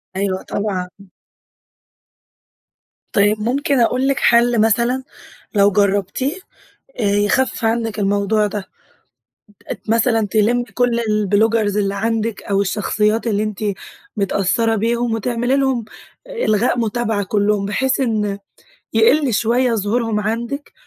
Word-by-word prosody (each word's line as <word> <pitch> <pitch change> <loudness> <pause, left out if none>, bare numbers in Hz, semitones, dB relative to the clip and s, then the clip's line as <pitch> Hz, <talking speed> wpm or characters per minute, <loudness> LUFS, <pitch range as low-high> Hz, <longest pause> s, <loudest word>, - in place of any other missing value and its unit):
أيوه 190 -1 -2
طبعًا. 195 -3 -3 2.3
طيب 205 +1 +3
ممكن 270 +4 0
أقول 250 +3 +2
لِك 275 0 +1
حل 235 -1 +4
مثلًا، 235 +4 +1 0.5
لو 200 -1 +5
جربتيه، 205 - 0 0.6
آآ، - - 0
يخفف 205 +5 +1
عنك 225 -1 -1
الموضوع 205 +1 +1
ده، 205 -1 -5 1.0
ت - - -7
مثلًا 225 -1 +2
تلمِّي 220 +4 +2
كل 245 -1 0
البلوجرز 215 0 +1
اللي 200 -1 0
عندك 225 +1 -2
أو 200 0 0
الشخصيات 210 +3 0
اللي 210 -1 +1
أنتِ 215 -2 -4 0.6
متأثرة 200 +3 +1
بيهم 235 +2 0
وتعملي 240 +3 0
لهم 265 -4 0 0.4
إلغاء 245 - 0
متابعة 225 -2 -1
كلهم، 205 0 0
بحيث 260 +7 0
إن 210 -5 -1 0.6
يقل 305 - +4
شوية 235 +3 +2
ظهورهم 220 +1 0
عندك، 235 +7 -4
220 Hz, 110 wpm, -19 LUFS, 205-240 Hz, 2.3 s, لو